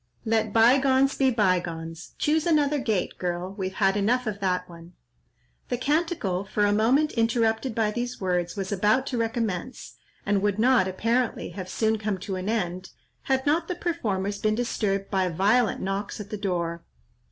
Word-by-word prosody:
Let 220 -1 +1
bygones 265 +4 +4
be 265 -1 +3
bygones! 175 -7 -1
Choose 315 +2 +1
another 295 -3 +2
gait, 215 -8 -1
girl; 180 +1 -3
we've 190 -2 -4
had 195 -1 +2
enough 240 +5 +1
of 210 -3 -3
that 180 -2 -1
one." 170 0 -13 0.8
The 245 - -1
canticle, 290 - 0
for 205 +1 0
a 205 - +2
moment 255 +9 +3
interrupted 225 +1 +1
by 220 -2 +1
these 240 +2 -4
words, 180 -2 -1
was 195 0 -4
about 210 +6 +2
to 250 -3 -2
recommence, 225 -1 -3 0.3
and 205 -1 +1
would 205 -1 0
not, 235 -4 +4
apparently, 230 +6 -1
have 185 -2 -7
soon 220 +2 0
come 210 -2 -2
to 195 - -4
an 185 +2 -3
end, 185 -4 -2 0.4
had 265 -1 +1
not 320 +3 +1
the 360 - -3
performers 205 - -2
been 215 0 +1
disturbed 205 -4 -1
by 190 -2 +1
violent 205 +7 +2
knocks 195 +2 -3
at 205 -1 -8
the - - -2
door. 170 -4 -2
210 Hz, 170 wpm, -26 LUFS, 190-245 Hz, 0.8 s, bygones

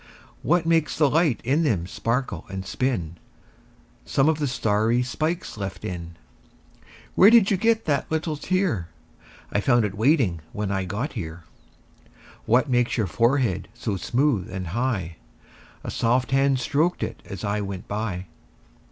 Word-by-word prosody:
What 170 +1 +2
makes 165 -2 +2
the 150 -2 +4
light 150 -5 +2
in 140 +7 +2
them 110 - +1
sparkle 115 +7 -2
and 95 0 -5
spin? 95 -9 -2 0.9
Some 135 +1 +2
of 160 -1 +1
the 145 - 0
starry 115 0 +1
twinkles 155 - -3
left 95 -2 -5
in. 85 -2 -6 1.0
Where 195 - +7
did 225 -4 +6
you 195 - +3
get 225 +3 +2
that 145 -4 0
little 160 0 -1
tear? 165 - 0 0.6
I 105 - +1
found 120 -1 +3
it 100 - -3
waiting 110 - +2
when 105 -1 -2
I 95 -1 -1
got 105 - -3
here. 80 +1 -6 1.0
What 125 +6 +4
makes 125 -2 +1
your 110 - +1
forehead 115 +1 +1
so 110 -4 -3
smooth 120 -1 0
and 95 -3 -4
high? 100 -6 -2 0.7
A - - -4
soft 125 +2 +1
hand 135 0 +3
stroked 150 +7 0
it - - -5
as 95 -4 -7
I 105 +1 -1
went 100 -1 -6
by. 100 -3 -3
120 Hz, 150 wpm, -24 LUFS, 95-145 Hz, 1.0 s, Where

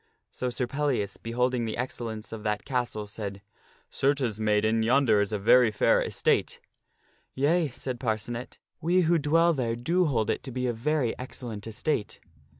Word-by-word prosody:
So 125 - -3
Sir 125 +1 -2
Pellias, 130 -6 -1
beholding 125 +1 0
the 110 - -3
excellence 115 -3 -5
of 110 -1 -6
that 105 -1 -2
castle, 120 -5 -2
said, 100 -2 -6 0.2
" - - -33
Certes, 135 -6 0
maid 105 -1 +2
en, 110 +1 +2
yonder 115 -2 +4
is 105 - -1
a 105 - 0
very 115 +4 +5
fair 105 - +3
estate." - - 0 0.4
" - - -39
Yea," 155 +4 +2
said 125 -1 -5
Parcenet; 115 +1 -3
" - - -54
we 175 +3 +3
who 170 0 +3
dwell 165 +3 +3
there 120 -5 -1
do 170 +10 +1
hold 115 -8 +1
it - - -2
to 130 - -8
be 125 +1 -2
a 120 - 0
very 130 +1 0
ex 125 +1 -8
cellent 110 -3 -6
estate." 115 +1 -2
120 Hz, 185 wpm, -27 LUFS, 110-140 Hz, 0.4 s, very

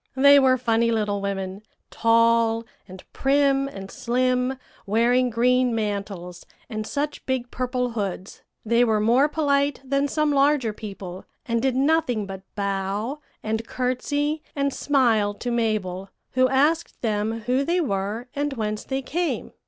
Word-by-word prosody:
"They 280 +1 +7
were 260 -1 +4
funny 230 -1 +1
little 210 -3 0
women 195 0 -4 0.3
tall, 230 0 +3 0.2
and 185 -1 -11
prim, 275 0 +2
and 195 -7 -8
slim, 255 +1 0 0.3
wearing 240 +4 +3
green 250 +1 +2
mantles 200 -5 -4 0.3
and 215 0 -4
such 290 +1 -3
big 255 -2 -2
purple 250 0 -2
hoods. 200 -3 -4 0.2
They 235 +2 +3
were 220 -3 +2
more 240 +7 +4
polite 285 -2 +1
than 275 +1 +1
some 305 +1 +1
larger 275 -5 +2
people, 195 -4 -8 0.2
and 230 -1 0
did 260 0 +1
nothing 270 -6 +1
but 190 -1 -7
bow, 200 +6 -2 0.2
and 220 +1 -2
courtesy, 290 +4 -1
and 280 -1 0
smile 225 -8 +2
to 245 +3 -4
Mabel, 205 -5 -1 0.2
who 255 0 +3
asked 300 +6 +1
them 220 0 -1
who 250 +5 +1
they 345 +5 +1
were 210 - -2
and 285 0 -1
whence 215 -3 -3
they 270 0 -3
came. 340 +6 -2
240 Hz, 145 wpm, -24 LUFS, 210-275 Hz, 0.3 s, They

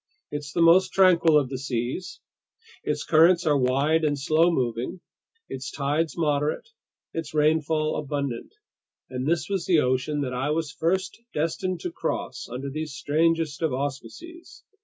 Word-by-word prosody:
It's 145 0 -5
the 170 +2 +2
most 175 +3 +5
tranquil 170 -5 +5
of 140 -4 +1
the 130 -1 -4
seas; 135 +8 -4 0.6
its - - -2
currents 170 +2 +4
are 150 -2 +3
wide 140 +5 +2
and 145 -2 +1
slow 155 +5 +3
moving, 125 +1 -2 0.5
its 135 +1 -6
tides 145 +3 -1
moderate, 150 - 0 0.5
its 160 -2 -5
rainfall 155 0 +2
abundant. 140 -4 -4 0.6
And 130 +1 -3
this 160 -2 +1
was 195 -3 -2
the 175 - +4
ocean 130 +3 0
that 130 -2 -3
I 130 +3 -1
was 155 -1 -1
first 185 +8 -1
destined 165 +4 -1
to 355 - -4
cross 340 - -4
under 130 +3 -5
these 155 0 -4
strangest 160 +1 0
of 160 -5 0
auspices. 235 - -7
150 Hz, 150 wpm, -25 LUFS, 140-165 Hz, 0.6 s, most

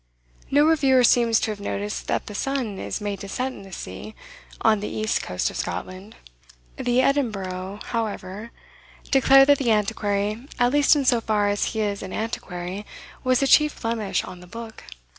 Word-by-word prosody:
No 290 +2 +4
reviewer 275 -5 +4
seems 235 -1 +4
to 220 - 0
have 210 - -6
noticed 205 +1 -4
that - - -1
the 210 - -8
sun 240 -3 -2
is - - -4
made 205 -1 -3
to 200 - -8
set 255 +5 -2
in - - -11
the 195 -1 -13
sea, 175 - -8 0.5
on 215 -2 +4
the 210 - -4
east 215 0 -1
coast 90 - -2
of - - -7
Scotland. 190 +4 -5 0.6
The 245 +1 +2
"Edinburgh," 200 -8 -1
however, 215 -2 -4 0.6
declared 270 0 +6
that 285 - +6
the 260 -4 0
Antiquary, 210 +2 0
"at 245 0 +3
least 290 +1 +5
in 285 -2 0
so 240 -2 +3
far 210 -2 +1
as 205 0 0
he 220 - 0
is 205 -1 -2
an 190 - -7
Antiquary," 190 -3 -4 0.4
was 255 0 +2
the 275 - +2
chief 300 +2 +4
blemish 225 -3 -1
on 185 -1 -9
the 180 - -13
book. 225 +3 -9
220 Hz, 180 wpm, -24 LUFS, 200-255 Hz, 0.6 s, declared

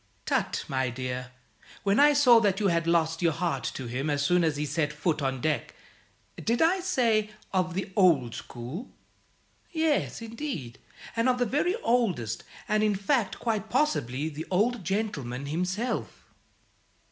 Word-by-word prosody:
"Tut, - - 0
my 130 -1 0
dear! 125 0 -4 0.5
When 200 +3 +3
I 295 +1 +7
saw 255 -5 +7
that 200 -3 +1
you 205 -2 +2
had 170 -1 +1
lost 165 -1 +2
your 170 -2 +3
heart 170 +1 -1
to 130 - -5
him 130 +5 -2
as 145 -1 +1
soon 180 +3 +3
as 155 -3 +1
he 150 - -1
set 150 +1 0
foot 150 +1 -1
on 135 -2 -1
deck! 155 +2 -1 0.7
Did 230 +1 +1
I 345 +4 +4
say 235 - +1 0.2
'of 180 -2 0
the 195 +1 -3
old 155 - +4
school'? 130 - -7 0.8
Yes, 320 -3 0
indeed, 225 - -6 0.4
and 230 +2 +2
of 250 - +2
the 245 - +2
very 300 - +1
oldest; 185 - +1 0.2
and, 215 0 +2
in 210 -1 +2
fact, 205 +2 0
quite 220 -2 -2
possibly 155 - 0
the 160 +1 -6
Old 215 +4 +1
Gentleman 150 - -2
himself." 180 - -2
180 Hz, 160 wpm, -28 LUFS, 145-230 Hz, 0.8 s, I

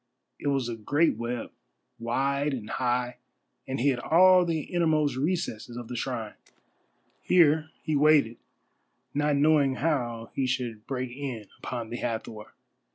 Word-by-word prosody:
It - - -4
was 135 -3 +1
a 120 - -3
great 145 +9 +1
web, 120 0 -4 0.5
wide 140 +4 0
and 110 -4 -7
high, 125 -1 -1 0.5
and 130 0 -3
hid 130 -1 +2
all 180 +6 +6
the 165 -2 -1
innermost 155 -5 +1
recesses 135 - -2
of 120 -1 -7
the 125 - -5
shrine. 115 -3 -3 0.9
Here 160 -3 +4
he 155 - -1
waited, 145 -6 +4 0.8
not 145 0 +1
knowing 145 -2 +3
how 120 -7 -2
he 135 - 0
should 120 -4 -3
break 130 -2 -3
in 130 -6 -5
upon 120 -3 -5
the 120 - -3
Hathor. 110 -3 -4
130 Hz, 140 wpm, -27 LUFS, 120-150 Hz, 0.9 s, all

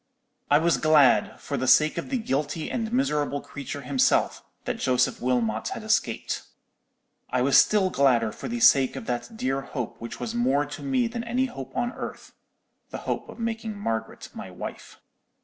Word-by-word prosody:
"I 145 - +6
was 160 -2 +2
glad, 150 -1 +4
for 140 - -4
the 130 0 -1
sake 155 +4 +5
of - - -6
the 265 - 0
guilty 150 - -2
and 225 -2 -2
miserable 150 - 0
creature 145 0 -7
himself, 265 - +1 0.2
that 230 - -3
Joseph 125 - +1
Wilmot 115 -3 0
had - - -7
escaped. - - 0 0.9
I 125 0 +1
was 140 +1 +3
still 195 -3 +5
gladder 120 -5 +3
for - - -7
the 240 +1 -3
sake 135 - +5
of - - -6
that 125 - -4
dear 135 -6 -1
hope 125 -5 -6
which 115 - -7
was 225 - -4
more 145 - +2
to 145 0 -8
me 260 -3 +1
than 230 0 -4
any 245 +3 0
hope 135 - -8
on 240 0 0
earth—the - - -11
hope - - -4
of - - -10
making 225 -2 -3
Margaret 115 - -4
my - - -8
wife. - - -8
145 Hz, 175 wpm, -26 LUFS, -, 0.9 s, I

